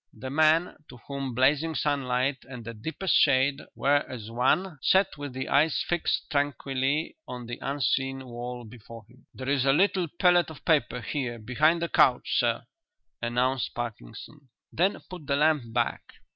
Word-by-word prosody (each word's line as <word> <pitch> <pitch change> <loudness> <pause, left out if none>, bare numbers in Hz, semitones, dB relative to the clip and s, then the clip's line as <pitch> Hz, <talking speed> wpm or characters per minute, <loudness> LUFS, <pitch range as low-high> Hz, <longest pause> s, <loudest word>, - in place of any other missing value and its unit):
The 130 0 -7
man 160 +3 +3
to - - -12
whom 135 -3 -5
blazing 145 +5 +2
sunlight 135 -2 0
and 125 -4 -9
the 115 - -6
deepest 160 - -2
shade 140 0 +3
were 140 +1 +3
as 115 -3 -7
one 150 +8 +1
sat 190 +5 +3
with 145 -3 -7
his 130 0 -4
eyes 145 +2 +2
fixed 175 -1 0
tranquilly 140 - -1
on 125 -1 -7
the 120 +1 -7
unseen 135 -1 -1
wall 120 0 -6
before 115 -1 -12
him. 125 +2 -22
"There 130 - -7
is 140 -2 +2
a 135 0 +4
little 185 +2 +2
pellet 175 +1 +3
of 160 - -12
paper 130 -6 +1
here 125 -3 -3
behind 155 +9 +1
the - - 0
couch, - - +3
sir," - - +1 0.6
announced 125 +2 0
Parkinson. 120 - -8 0.2
"Then 185 +4 +1
put 180 -6 -10
the 140 - +1
lamp 150 -5 +2
back." - - 0
135 Hz, 160 wpm, -27 LUFS, 125-155 Hz, 0.6 s, a